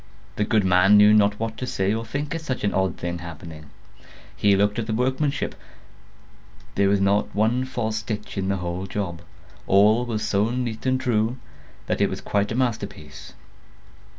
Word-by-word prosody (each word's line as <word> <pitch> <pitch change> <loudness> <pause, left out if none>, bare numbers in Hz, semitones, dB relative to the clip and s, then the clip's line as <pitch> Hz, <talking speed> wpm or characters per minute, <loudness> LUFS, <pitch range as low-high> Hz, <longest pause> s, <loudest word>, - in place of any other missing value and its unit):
The 105 - 0
good 110 -1 +2
man 95 +3 +5
knew 105 +1 +7
not 105 -1 +3
what 115 0 -3
to 130 - -4
say 95 -3 0
or 115 +1 -2
think 145 +7 -4
at 165 - -4
such 130 -5 -4
an 100 - +1
odd 95 0 0
thing 85 0 -4
happening. 80 -2 -10 0.7
He 100 -1 +3
looked 100 +2 +1
at 110 - -3
the 110 - -1
workmanship; 130 +4 -1 1.2
there 100 0 +2
was 100 0 +3
not 100 +1 +1
one 115 +5 +1
false 110 -4 -2
stitch 105 -1 -5
in 95 -2 -2
the 100 - 0
whole 90 +1 -4
job; 90 -4 -4 0.5
all 105 +5 +5
was 110 -3 -2
so 100 +2 +1
neat 120 -1 -3
and 130 0 +2
true, 120 -2 0 0.5
that - - -1
it - - +3
was - - -5
quite 100 +1 -1
a - - -2
masterpiece. 100 - -4
105 Hz, 180 wpm, -24 LUFS, 95-120 Hz, 1.2 s, knew